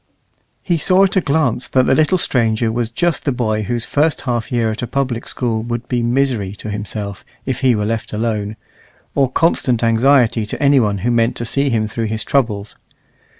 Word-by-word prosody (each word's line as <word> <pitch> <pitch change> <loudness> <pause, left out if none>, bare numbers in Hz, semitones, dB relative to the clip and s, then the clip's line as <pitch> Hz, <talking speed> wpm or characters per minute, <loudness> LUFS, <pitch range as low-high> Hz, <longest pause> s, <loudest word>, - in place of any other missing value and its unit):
He 170 -3 0
saw 185 +4 +4
at 195 0 +1
a 190 - +4
glance 140 -6 0
that 130 -1 +2
the - - +3
little 155 +5 +3
stranger 115 -7 +1
was 115 0 -2
just 170 +7 0
the 140 - 0
boy 110 -4 -1
whose 115 +2 -2
first 150 +2 +1
half 120 -4 -2
year 115 -2 +1
at 110 - -5
a 120 - -3
public 130 -3 -2
school 115 -3 -2
would 120 +1 -4
be 125 -2 0
misery 120 -5 0
to 105 - -7
himself 105 -1 -5 0.2
if 130 -2 -2
he 130 -3 +3
were 105 -1 -1
left 110 0 -3
alone, 105 -1 -2 0.6
or 135 -2 +2
constant 130 -7 +1
anxiety 115 0 +3
to - - -6
any 140 -1 +4
one 105 -4 +1
who 120 - +2
meant 115 0 +2
to 120 - -3
see 140 +4 0
him 110 -3 +1
through 115 +2 -3
his 110 0 -3
troubles. 110 -7 -1
120 Hz, 200 wpm, -18 LUFS, 110-135 Hz, 0.6 s, saw